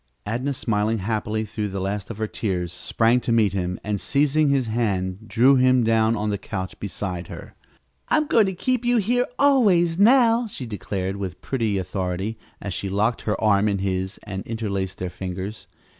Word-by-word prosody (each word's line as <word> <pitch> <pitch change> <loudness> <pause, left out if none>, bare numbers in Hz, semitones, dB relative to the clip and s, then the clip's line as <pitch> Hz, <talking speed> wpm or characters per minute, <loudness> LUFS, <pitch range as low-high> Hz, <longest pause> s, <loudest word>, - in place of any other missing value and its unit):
Adnah, 125 +6 -2
smiling 110 -2 0
happily 110 +1 -2
through 105 0 -3
the 95 0 -4
last 95 +1 -3
of 115 - -6
her 110 - -1
tears, 90 -5 -2
sprang 115 +7 +2
to 120 - -2
meet 110 -4 +3
him, 90 -1 -2
and, 105 -1 -2
seizing 145 +1 +2
his 135 -2 +2
hand, 105 -3 -2
drew 130 +4 +5
him 130 -1 +4
down 110 0 +3
on 105 -1 -1
the 100 - -2
couch 95 -2 -5
beside 90 -3 -4
her. - - -10 0.6
"I'm 310 -1 +3
going 225 -7 +4
to 190 - -2
keep 250 +6 -1
you 240 0 +3
here 245 +4 +1
always, 195 -12 +4
now," 235 +1 +5
she 140 -11 -7
declared 100 -3 -4
with 95 -3 -5
pretty 115 -6 -1
authority, 95 +3 -3 0.2
as 100 - -5
she 100 - -3
locked 105 +5 0
her 105 - -1
arm 105 -1 +3
in 100 -1 +1
his 95 0 -2
and 95 -1 -5
interlaced 100 -5 -3
their 90 -1 -4
fingers. 95 +4 -6
110 Hz, 185 wpm, -23 LUFS, 95-130 Hz, 0.6 s, drew